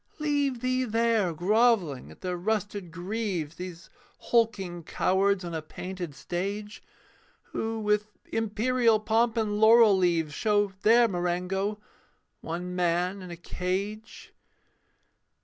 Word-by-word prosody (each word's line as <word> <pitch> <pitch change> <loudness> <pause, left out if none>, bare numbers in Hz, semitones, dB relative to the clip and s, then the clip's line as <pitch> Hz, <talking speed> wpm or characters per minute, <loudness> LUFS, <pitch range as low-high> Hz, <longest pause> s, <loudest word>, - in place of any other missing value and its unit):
Leave 285 -5 0
thee 255 0 +1
there 225 -5 +1
grovelling 185 - +2
at - - -15
their 180 -1 -2
rusted 205 0 -2
greaves, 180 -3 -3
These 180 -2 -8 0.3
hulking 200 -7 0
cowards 190 +3 +1
on 170 - -5
a 160 - -2
painted 175 -1 -7
stage, 200 +6 -4 0.7
Who, 225 0 -2
with 210 0 +1 0.3
imperial 225 +1 +2
pomp 225 +2 +1
and 210 -2 0
laurel 220 -1 +7
leaves, 170 -4 +1
Show 205 0 +1
their 235 +3 +6
Marengo 185 +2 -1 0.6
one 180 +2 -5
man 180 +2 0
in 180 - -9
a 170 - -7
cage. 195 +6 -4
200 Hz, 115 wpm, -27 LUFS, 180-225 Hz, 0.7 s, laurel